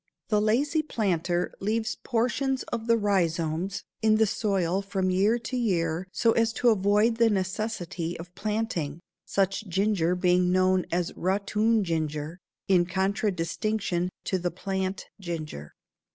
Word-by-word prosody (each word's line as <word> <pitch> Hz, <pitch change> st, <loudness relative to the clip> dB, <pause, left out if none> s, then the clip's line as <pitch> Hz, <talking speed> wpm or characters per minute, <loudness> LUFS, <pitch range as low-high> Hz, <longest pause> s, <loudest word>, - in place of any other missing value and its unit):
The 210 Hz, -1 st, +3 dB
lazy 275 Hz, +9 st, +2 dB
planter 180 Hz, -, -1 dB
leaves 220 Hz, +3 st, -1 dB
portions 255 Hz, +2 st, 0 dB
of 230 Hz, -1 st, -3 dB
the 230 Hz, 0 st, +4 dB
rhizomes 175 Hz, -3 st, 0 dB, 0.2 s
in 220 Hz, -1 st, +4 dB
the 220 Hz, 0 st, +4 dB
soil 195 Hz, -3 st, 0 dB
from 190 Hz, -1 st, -1 dB
year 200 Hz, +5 st, +3 dB
to 240 Hz, +2 st, -5 dB
year 180 Hz, -7 st, 0 dB
so 230 Hz, +2 st, +3 dB
as 225 Hz, 0 st, +2 dB
to 245 Hz, -, +3 dB
avoid 210 Hz, +2 st, +3 dB
the 230 Hz, -1 st, +5 dB
necessity 185 Hz, -4 st, -2 dB
of 175 Hz, +2 st, -10 dB
planting, 210 Hz, -9 st, -2 dB, 0.3 s
such 195 Hz, +2 st, 0 dB
ginger 185 Hz, -2 st, +1 dB
being 180 Hz, 0 st, +3 dB
known 185 Hz, 0 st, +3 dB
as 175 Hz, 0 st, -1 dB
"ratoon 210 Hz, +4 st, +1 dB
ginger" 160 Hz, -1 st, -2 dB, 0.3 s
in 180 Hz, -3 st, +4 dB
contradistinction 190 Hz, 0 st, -1 dB, 0.2 s
to 190 Hz, -, 0 dB
the 175 Hz, 0 st, -1 dB
"plant 190 Hz, +1 st, -3 dB
ginger." 155 Hz, -, -6 dB
195 Hz, 135 wpm, -27 LUFS, 175-220 Hz, 0.3 s, the